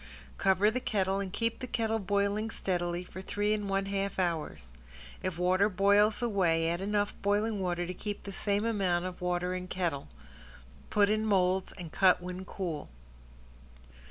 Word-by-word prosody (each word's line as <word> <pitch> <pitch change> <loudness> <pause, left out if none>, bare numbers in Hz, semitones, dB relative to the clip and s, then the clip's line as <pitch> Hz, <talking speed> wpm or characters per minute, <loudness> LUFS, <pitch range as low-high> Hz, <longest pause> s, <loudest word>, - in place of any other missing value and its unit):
Cover 195 +2 +4
the 255 - -1
kettle 195 -5 0
and 195 -2 -3
keep 230 +3 -1
the 255 - -5
kettle 225 -2 0
boiling 200 +2 0
steadily 175 -4 -2
for 185 +1 -9
three 205 +2 0
and 205 -2 -2
one 195 0 +1
half 195 0 -2
hours. 155 - -2 0.5
If 185 -3 -3
water 185 +3 +3
boils 205 +3 +3
away 175 -8 +2
add 175 +2 -2
enough 205 +1 0
boiling 205 +1 +1
water 175 -2 -1
to 180 - -4
keep 205 +2 -5
the 200 - -7
same 205 +2 0
amount 190 -6 +1
of 185 -1 -6
water 180 0 0
in 180 0 -4
kettle. 170 -7 -2 0.8
Put 205 0 +3
in 215 0 +1
molds 190 -3 +2
and 170 -3 -8
cut 185 -2 +5
when 180 +1 -6
cool. 170 -8 -4
195 Hz, 165 wpm, -30 LUFS, 180-205 Hz, 0.8 s, cut